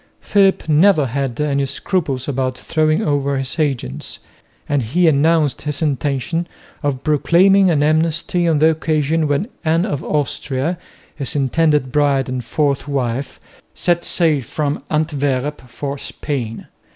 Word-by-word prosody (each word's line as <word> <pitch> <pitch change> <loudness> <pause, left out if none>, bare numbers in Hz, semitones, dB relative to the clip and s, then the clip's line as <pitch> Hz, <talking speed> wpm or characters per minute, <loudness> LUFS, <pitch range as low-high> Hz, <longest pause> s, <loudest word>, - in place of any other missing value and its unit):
Philip 195 -5 +2
never 155 0 +4
had 130 -1 -3
any 140 -2 0
scruples 140 -3 -2
about 130 -2 -1
throwing 155 +2 +1
over 140 -2 0
his 135 +4 -3
agents, 120 - -2 0.5
and 145 -1 +1
he 165 +10 +1
announced 155 0 +2
his 150 -1 -3
intention 145 +4 -1 0.3
of 140 -3 -2
proclaiming 185 +6 +4
an 150 -4 +2
amnesty 165 +3 +1
on 160 -2 +3
the 160 +2 +5
occasion 155 0 0
when 145 +8 0 0.2
Anne 165 +2 +2
of 145 -10 -3
Austria, 145 +2 -2 0.4
his 140 -2 -1
intended 145 0 +1
bride 140 -2 +2
and 130 -1 -3
fourth 140 +2 -1
wife, 135 -1 -2 0.4
set 175 -1 +1
sail 160 -5 +2
from 145 +4 -3
Antwerp 145 -3 -1
for 140 +3 -5
Spain. 125 -8 -5
145 Hz, 135 wpm, -18 LUFS, 135-160 Hz, 0.5 s, the